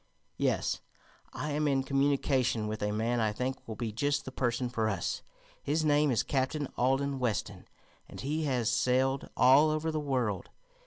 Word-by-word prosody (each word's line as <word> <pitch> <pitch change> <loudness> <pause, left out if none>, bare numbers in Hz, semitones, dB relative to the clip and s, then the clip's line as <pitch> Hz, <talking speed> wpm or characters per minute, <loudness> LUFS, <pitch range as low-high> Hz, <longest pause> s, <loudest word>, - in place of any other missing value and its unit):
"Yes; - - 0 0.5
I 150 - -4
am 150 +1 0
in 135 -2 +2
communication 135 -4 +1
with 110 +1 -4
a 105 0 0
man 115 +3 0
I 110 -2 +2
think 130 +5 -4
will 110 - -5
be 115 -1 -3
just 145 +6 0
the 130 - -6
person 125 -1 -1
for 115 -3 0
us. 95 -5 -2 0.4
His 155 +2 0
name 150 0 +4
is 120 - +2
Captain 140 +2 -1
Alden 135 +2 +1
Weston, 105 -5 -2 0.4
and - - -10
he 155 +3 -1
has 125 -4 +1
sailed 130 +2 +1
all 135 +5 +6
over 155 +1 -1
the 155 - -1
world. 125 -9 -1
130 Hz, 170 wpm, -30 LUFS, 115-145 Hz, 0.5 s, all